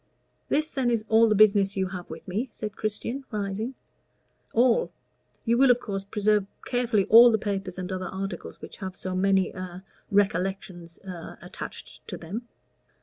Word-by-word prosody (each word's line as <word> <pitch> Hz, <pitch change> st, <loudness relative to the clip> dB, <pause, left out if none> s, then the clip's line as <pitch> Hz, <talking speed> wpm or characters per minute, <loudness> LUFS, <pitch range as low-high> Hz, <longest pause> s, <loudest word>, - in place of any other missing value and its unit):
"This, 310 Hz, +2 st, +1 dB
then, 260 Hz, -3 st, 0 dB
is 230 Hz, -2 st, 0 dB
all 225 Hz, +1 st, +6 dB
the 215 Hz, -, +3 dB
business 200 Hz, -1 st, +4 dB
you 190 Hz, -1 st, 0 dB
have 180 Hz, -2 st, -7 dB
with -, -, -9 dB
me?" 215 Hz, +8 st, -2 dB
said 215 Hz, -1 st, -6 dB
Christian, 230 Hz, +5 st, -3 dB
rising. 210 Hz, +3 st, -3 dB, 0.8 s
"All. 250 Hz, -, +3 dB, 0.5 s
You 235 Hz, +1 st, +2 dB
will, 270 Hz, -1 st, +6 dB
of 245 Hz, 0 st, +5 dB
course, 195 Hz, -4 st, -4 dB
preserve 210 Hz, 0 st, +1 dB, 0.2 s
carefully 240 Hz, -5 st, +1 dB
all 235 Hz, +2 st, +9 dB
the 220 Hz, -, +3 dB
papers 195 Hz, -4 st, -3 dB
and 185 Hz, 0 st, -4 dB
other 185 Hz, 0 st, -3 dB
articles 195 Hz, +1 st, -6 dB
which -, -, -9 dB
have 190 Hz, -1 st, -6 dB
so 185 Hz, -1 st, -4 dB
many 190 Hz, 0 st, +2 dB
a 185 Hz, 0 st, -8 dB, 0.3 s
recollections 190 Hz, -3 st, -1 dB
a 180 Hz, -4 st, -8 dB
attached -, -, -9 dB
to -, -, -5 dB
them?" 215 Hz, +9 st, -6 dB
200 Hz, 165 wpm, -26 LUFS, 190-230 Hz, 0.8 s, all